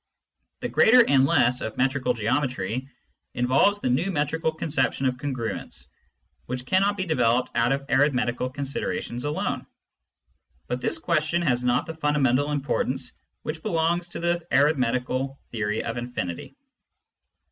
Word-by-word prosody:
The - - -1
greater 245 +1 +6
and 135 -1 +4
less 125 -1 +3
of 110 - -5
metrical 130 -1 +1
geometry 125 +1 -1 0.5
involves 130 +11 +3
the - - 0
new 140 +10 +1
metrical 160 -1 0
concep 155 -3 0
tion 135 - -3
of 125 -1 +1
congruence^ 130 -5 -4 0.6
which 125 +1 -4
cannot 195 +5 +2
be 185 - -1
developed 125 -6 +2
out 120 +1 +2
of 140 0 -1
arithmetical 125 -3 +1
considerations 135 -2 -4
alone. 145 +1 -2 1.0
But 125 +1 -3
this - - +1
question 170 +1 0
has 125 -6 +1
not 125 0 +2
the 160 - -6
fundamental 145 -3 +1
importance 145 -2 -1 0.3
which 155 +1 -4
belongs 170 +2 0
to - - -5
the 170 0 0
arithmetical 135 -1 +1
theory 110 -2 -1
of 115 - -4
infinity. 120 -8 -5
135 Hz, 135 wpm, -25 LUFS, 125-155 Hz, 1.0 s, greater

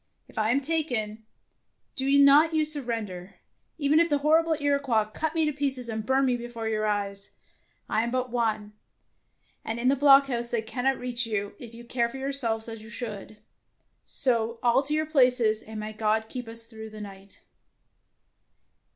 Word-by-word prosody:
If - - -19
I 215 0 +1
am 275 +4 +2
taken, 245 -9 -2 0.7
do 265 0 0
not 290 +3 +6
you 310 -1 +2
surrender, 225 -11 -3 0.4
even 300 +1 +3
if 335 0 +3
the 290 - +2
horrible 315 +2 +2
Iroquois 280 -6 +1
cut 305 +9 -4
me 320 -1 +2
to 300 - -1
pieces 270 -4 0
and 220 -1 -3
burn 265 +4 +2
me 250 -2 +2
before 235 -1 -6
your 215 -1 -1
eyes. 200 -1 -3 0.6
I 220 - +1
am 235 - -2
but 255 0 -2
one, 215 -3 -1 0.9
and 225 +1 -4
in 250 +2 +2
the 275 - +3
block 280 0 +6
house 240 -3 -1
they 235 -2 -1
cannot 255 +4 -1
reach 245 -1 -3
you 205 -2 -3
if 235 -2 -10
you 235 +1 -11
care 235 -1 0
for 255 - -8
yourselves 265 -5 +1
as 225 -1 -8
you 220 - -12
should. 215 -2 -7 0.7
So 235 -2 0
all 240 +2 +4
to 285 +2 +1
your 310 0 0
places, 250 -7 +3
and 220 0 -8
may 215 0 -6
God 220 +1 0
keep 250 -1 -6
us 230 0 -2
through 220 -1 -10
the 215 0 -10
night. 195 -1 -11
235 Hz, 180 wpm, -26 LUFS, 220-275 Hz, 0.9 s, not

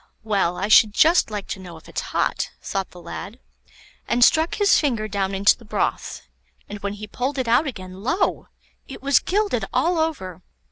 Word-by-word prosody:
"Well, 195 -5 0
I 200 - -2
should 215 -1 +6
just 330 -3 +4
like 210 -2 -5
to 195 - -4
know 175 -3 -10
if 160 - -17
it's - - -4
hot," - - -1
thought 195 -1 -4
the 180 - -14
lad, 205 +6 -8 0.7
and 240 +1 +3
struck 320 +1 +2
his 410 -1 +4
finger 235 -8 -1
down 195 -1 -2
into 200 +1 +4
the - - -18
broth, 210 - -3 0.4
and 205 - -7
when 200 -1 -4
he 210 +1 -8
pulled 255 +6 -3
it 260 -2 -1
out 240 +7 +3
again, 185 -6 -8
lo! 330 - -1 0.4
it 270 - -10
was 280 -1 +4
gilded 415 +2 -1
all 345 -1 +1
over. 270 - -3
215 Hz, 190 wpm, -22 LUFS, 195-280 Hz, 0.7 s, should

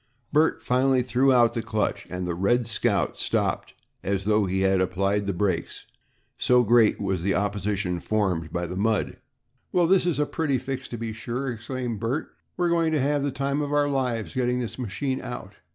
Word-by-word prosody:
Bert 155 +2 +3
finally 130 0 +2
threw 130 +2 +3
out 120 -2 +5
the 115 - -1
clutch 110 -2 -2
and 90 0 -4
the 85 - -1
"Red 115 +8 +1
Scout" 110 -2 0
stopped - - -1 0.3
as 95 -1 -2
though 105 -1 +2
he 95 +1 0
had 95 -1 +3
applied 100 +2 0
the - - +1
brakes, 90 -2 -2 0.5
so 125 0 +4
great 115 -1 +4
was 95 -4 -1
the 95 +2 +1
opposition 100 -2 -1
formed 90 -6 -1
by 85 +1 -2
the 90 +2 -5
mud. 105 +2 0 0.5
"Well, 180 -1 +3
this 185 +1 +3
is 175 - +1
a 150 - +2
pretty 145 -3 0
fix, 130 +1 -5
to 120 - -6
be 115 -1 -4
sure," 120 +4 -3
exclaimed 120 0 -4
Bert. 120 +7 -2 0.2
"We're 175 -1 +1
going 165 -1 +2
to 155 - +2
have 145 +2 +1
the 140 - 0
time 140 +2 -1
of 145 -1 -3
our 145 0 +3
lives 125 -6 -1
getting 125 -1 0
this 115 -1 -5
machine 130 +4 -2
out. 105 -5 -7
115 Hz, 195 wpm, -25 LUFS, 100-135 Hz, 0.5 s, out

